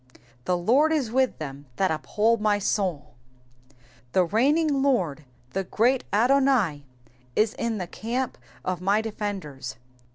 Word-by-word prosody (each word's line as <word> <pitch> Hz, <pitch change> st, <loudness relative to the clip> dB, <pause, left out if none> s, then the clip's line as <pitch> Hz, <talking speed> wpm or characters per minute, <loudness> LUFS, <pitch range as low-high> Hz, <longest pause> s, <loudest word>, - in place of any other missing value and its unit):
*TA« 180 Hz, -, +1 dB
Ijord 255 Hz, -, +3 dB
is 280 Hz, -8 st, 0 dB
wUh 260 Hz, +1 st, +2 dB
them 140 Hz, -2 st, -7 dB
that 190 Hz, -2 st, +1 dB
uphold 210 Hz, +8 st, +1 dB
my 210 Hz, -1 st, +3 dB
sotd,^^ 190 Hz, -6 st, -1 dB, 1.1 s
The 185 Hz, -, +4 dB
reigning 280 Hz, -, +2 dB
Lord, 180 Hz, -, +1 dB, 0.3 s
the 195 Hz, -, -1 dB
great 240 Hz, +7 st, +1 dB
Adouai 245 Hz, -, +3 dB, 0.5 s
is 215 Hz, 0 st, +2 dB
in 230 Hz, -2 st, -2 dB
the 185 Hz, -, -3 dB
camp 235 Hz, -, -3 dB, 0.3 s
of 185 Hz, -1 st, -2 dB
my 200 Hz, +3 st, +2 dB
defenders. 195 Hz, -, -5 dB
210 Hz, 130 wpm, -25 LUFS, 180-250 Hz, 1.1 s, The